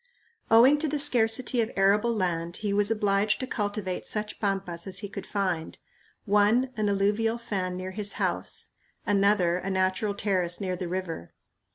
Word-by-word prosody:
Owing 250 +6 +6
to 315 - 0
the 300 +1 -1
scarcity 245 -3 +2
of 220 - -1
arable 200 +4 +3
land 170 -3 -2
he 200 - 0
was 205 0 +2
obliged 210 -1 +1
to 260 - -2
cultivate 205 -6 -3
such 210 0 -4
pampas 195 -4 -2
as 190 -1 -1
he - - -4
could 195 - -8
find 185 -5 -2 0.5
one 210 +5 +3
an 215 -1 0
alluvial 210 +3 +1
fan 190 -6 -3
near 185 +1 -5
his 205 +1 -3
house, - - -2 0.4
another 200 -4 +2
a 190 - -4
natural 190 +2 0
terrace 185 -4 0
near 185 -3 -2
the 180 -1 -5
river. 170 - -5
200 Hz, 165 wpm, -27 LUFS, 185-215 Hz, 0.5 s, Owing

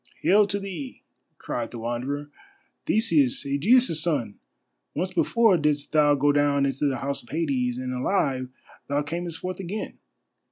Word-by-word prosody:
"Hail 205 +2 +5
to 200 - -1
thee," 180 -9 -7 0.3
cried 115 -2 -4
the 120 - -8
Wanderer, 130 +6 -4 0.6
"Theseus, 155 - +2
Ægeus' 165 - +3
son! 135 -12 -1 0.6
Once 185 +4 -2
before 225 -6 +3
didst 150 -2 0
thou 150 -1 +4
go 145 +1 +3
down 145 -1 +2
into 135 +1 0
the 135 - -1
House 140 0 -3
of 120 - -20
Hades, 135 -6 -1
and 130 0 -4
alive 130 -2 0 0.4
thou 145 +1 +1
camest 170 +2 -4
forth 185 0 -5
again. 195 +3 -5
145 Hz, 150 wpm, -25 LUFS, 135-175 Hz, 0.6 s, Hail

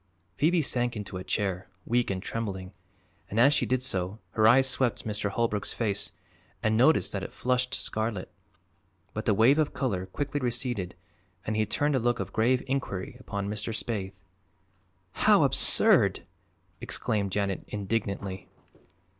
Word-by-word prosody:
Phoebe 160 - +2
sank 120 -2 0
into 105 -3 -5
a 90 - -6
chair, 95 -1 -2 0.2
weak 120 +1 +1
and 95 -1 -3
trembling, 95 -5 -4 0.6
and 110 - -1
as 135 +5 +6
she - - +1
did 130 0 0
so 95 -4 -1
her 110 -1 +4
eyes 130 +3 +6
swept 130 -3 0
Mr. 105 -1 -1
Holbrook's 105 -1 -1
face 105 -6 0 0.5
and 110 -1 +2
noticed 130 +7 +4
that 100 - -3
it - - -6
flushed 125 +1 0
scarlet. 110 -3 -3 0.8
But 110 - -4
the 105 - +3
wave 125 +8 +5
of 155 - 0
color 95 -9 -1
quickly 145 +8 -3
receded 120 -7 -2 0.5
and 110 - -1
he 110 0 +1
turned 145 +7 +1
a - - +2
look 120 0 +1
of - - -5
grave 120 +3 +2
inquiry 135 -2 -3
upon 100 -5 -4
Mr. 105 +2 -3
Spaythe. 95 -5 -4 0.9
"How - - +4
absurd!" - - +4 0.6
exclaimed 100 -3 -1
Janet 100 -1 -1
indignantly. 100 -2 -3
110 Hz, 150 wpm, -28 LUFS, 100-125 Hz, 0.9 s, as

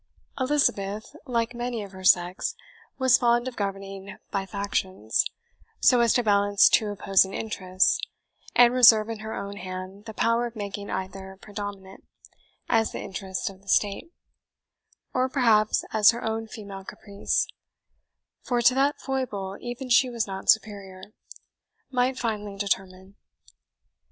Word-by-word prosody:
Elizabeth, 250 -4 0
like 235 -1 -1
many 240 -2 -4
of 200 - -10
her 190 -1 -11
sex, 180 0 +2 0.4
was 260 -2 +4
fond 240 0 +2
of 255 - -5
governing 195 -1 -5
by 195 -1 -2
factions, 190 - -1 0.5
so 250 - +5
as 235 -1 +4
to 245 - +2
balance 205 -1 +4
two 215 - +3
opposing 195 -1 +2
interests, 185 -4 0 0.6
and 245 0 +6
reserve 230 -3 +6
in 225 -1 -5
her 220 +1 -6
own 200 0 -6
hand 185 +2 -8
the 220 - -8
power 230 +1 +1
of 235 - -12
making 205 -1 -6
either 190 0 -6
predominate, 205 -2 -8 0.6
as 225 -1 +2
the - - -6
interest 190 -1 -5
of 195 -1 -7
the 200 - -26
state, 205 - 0 1.0
or 255 0 +1
perhaps 225 -6 +3
as 215 -1 +6
her 235 +1 0
own 225 0 -2
female 200 -3 -9
caprice 200 +1 -2 1.0
(for 245 -2 -1
to 240 +1 +5
that 275 +2 +1
foible 215 -8 -3
even 245 +2 -6
she 250 +1 +4
was 235 -3 -2
not 195 -1 -6
superior), 200 -2 0 0.8
might 255 0 +1
finally 210 -4 -3
determine. 190 -1 -3
210 Hz, 140 wpm, -26 LUFS, 195-235 Hz, 1.0 s, and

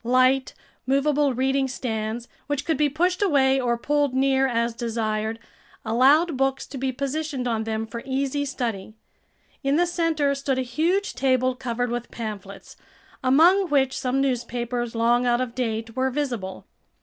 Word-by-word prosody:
Light, 255 +2 +3 0.3
movable 280 0 +2
reading 265 +2 +1
stands, 230 -2 -4 0.2
which 290 -1 -2
could 320 - +1
be 300 -1 +2
pushed 355 +6 0
away 270 -8 +3
or 240 -1 0
pulled 285 +1 0
near 270 0 +3
as 235 -1 0
desired, 220 -1 -2 0.5
allowed 275 +8 +4
books 270 0 0
to 275 - -6
be 265 0 0
positioned 275 0 -3
on 225 -2 -1
them 220 0 -2
for 230 +1 -7
easy 270 +1 -1
study. 225 -7 -4 0.7
In 275 +1 +2
the 350 +3 +3
center 330 -5 +1
stood 275 -1 -1
a 260 - 0
huge 335 +11 0
table 255 0 +2
covered 245 -1 -3
with 240 0 -4
pamphlets, 210 -4 -7 0.5
among 340 +9 +5
which 270 -2 +2
some 255 +1 -1
newspapers, 240 -2 -2
long 240 +2 +2
out 240 0 +3
of 255 -2 -2
date, 225 -2 -3
were 260 0 +1
visible. 245 -9 -4
260 Hz, 155 wpm, -24 LUFS, 235-280 Hz, 0.7 s, among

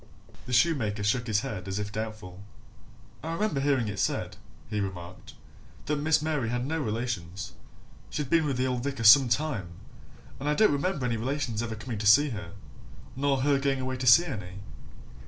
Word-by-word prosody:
The - - -6
shoemaker 120 -8 +2
shook 120 +4 0
his 105 -1 +1
head 95 -5 -6
as 95 0 -3
if 105 0 -3
doubtful. 105 -4 -6 0.8
"I 165 +1 -4
remember 205 -5 -1
hearing 135 -4 +1
it 100 -1 -4
said," - - -1 0.3
he 105 0 -2
remarked, 95 -3 -7 0.5
"that 150 - -1
Miss 155 0 +2
Mary 150 -7 -1
had 120 +1 -2
no 160 +3 -2
relations. 105 - -4 0.6
She'd 150 -2 -3
been 160 +1 +2
with 135 -3 -1
the 130 - +1
old 125 -2 -2
vicar 135 -4 -3
some 125 +3 +8
time, 115 - -1 0.7
and 145 +2 -2
I 150 - +2
don't 215 -4 +4
remember 145 -1 -1
any 115 -2 0
relations 125 -2 -2
ever 115 -1 -4
coming 115 0 -6
to 105 - 0
see 145 +8 +6
her, 100 -5 -7 0.6
nor 135 0 +1
her 140 0 +2
going 135 -1 0
away 130 0 -3
to 130 0 -3
see 165 +9 +8
any." 100 - -7
125 Hz, 185 wpm, -28 LUFS, 105-145 Hz, 0.8 s, some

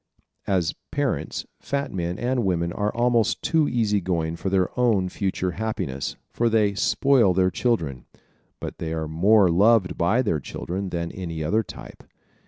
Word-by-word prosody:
As 90 -4 +1 0.2
parents 140 - -2
fat 140 0 -3
men 90 -1 -2
and 125 0 0
women 85 -3 0
are 105 0 -1
almost 120 -2 +2
too 160 -3 +2
easy 105 -4 +1
going 85 -2 -1
for 95 - -3
their 95 -1 +2
own 110 -7 +2
future 95 -1 -2
happiness, 90 -10 -3 0.2
for 120 0 +1
they 105 -3 +2
"spoil" 115 -2 +3
their 95 0 +3
children. 80 - -1 0.5
But - - -7
they 80 -1 -3
are 80 -1 -3
more 95 +4 +4
loved 100 +2 +3
by 100 +9 +3
their 85 -9 0
children 95 +7 -5
than 85 -1 -3
any 85 -4 -5
other 105 +9 +2
type. 105 - -11
95 Hz, 160 wpm, -24 LUFS, 85-115 Hz, 0.5 s, more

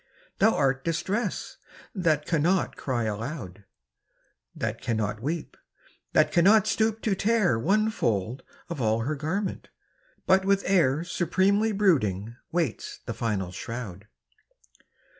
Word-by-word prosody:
Thou - - +4
art 135 -1 +1
Distress 190 +6 -2 0.2
— - - -22
^that 160 -6 +1
cannot 170 +3 +1
cry 120 -4 -2
alou<^ 110 - -5 0.9
That - - -3
cannot 110 -2 -2
weep, 155 +5 -3 0.6
that - - +4
cannot 195 +4 +5
stoop 220 0 0
to 215 - +2
tear 200 - +2
One 215 - +2
fold 115 - -1 0.3
of 170 -6 -5
all 110 0 +1
her 135 +7 -1
garment, 180 +7 -3 0.6
but 190 0 +4
with 195 0 +2
air 165 -6 +3
Supremely 190 +5 +1
brooding 120 - +1 0.2
waits 165 -8 -2
the - - -3
final 100 -6 -2
shroud 105 -3 -7
155 Hz, 120 wpm, -27 LUFS, 115-195 Hz, 0.9 s, cannot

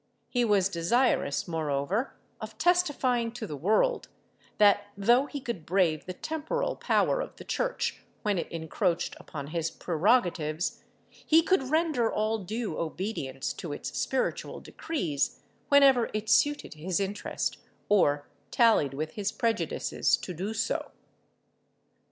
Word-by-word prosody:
He 245 -1 +1
was 205 -4 +3
desirous, 195 - +1
moreover, 160 - -1 0.2
of - - -8
testifying 270 -10 +2
to 240 -2 -5
the 155 - -6
world, 220 - +1 0.5
that 205 -1 +5
though 240 +7 +4
he 290 - -5
could 235 - -5
brave 170 -3 +1
the 185 - -4
temporal 320 - -2
power - - +1
of - - -7
the - - -11
Church - - -2 0.2
when 205 -4 +1
it - - -5
encroached 165 +2 -1
upon 140 -2 -7
his 165 0 -1
prerogatives, 170 -3 0 0.2
he 320 +1 +2
could 295 -8 +1
render 310 -7 +2
all 215 +1 0
due 215 -1 -4
obedience 160 -6 -3
to 160 -4 -6
its - - -6
spiritual 265 - -1
decrees 165 - -2 0.3
whenever 275 -4 +6
it 215 +1 -1
suited 290 +5 +2
his 170 +4 -2
interest 200 +1 -2 0.3
or 145 -8 +3 0.2
tallied 220 - +3
with 155 +2 -3
his 205 -1 -2
prejudices 230 -3 0
to 180 - -7
do 190 +6 -4
so. - - -1
205 Hz, 135 wpm, -28 LUFS, 165-255 Hz, 0.5 s, whenever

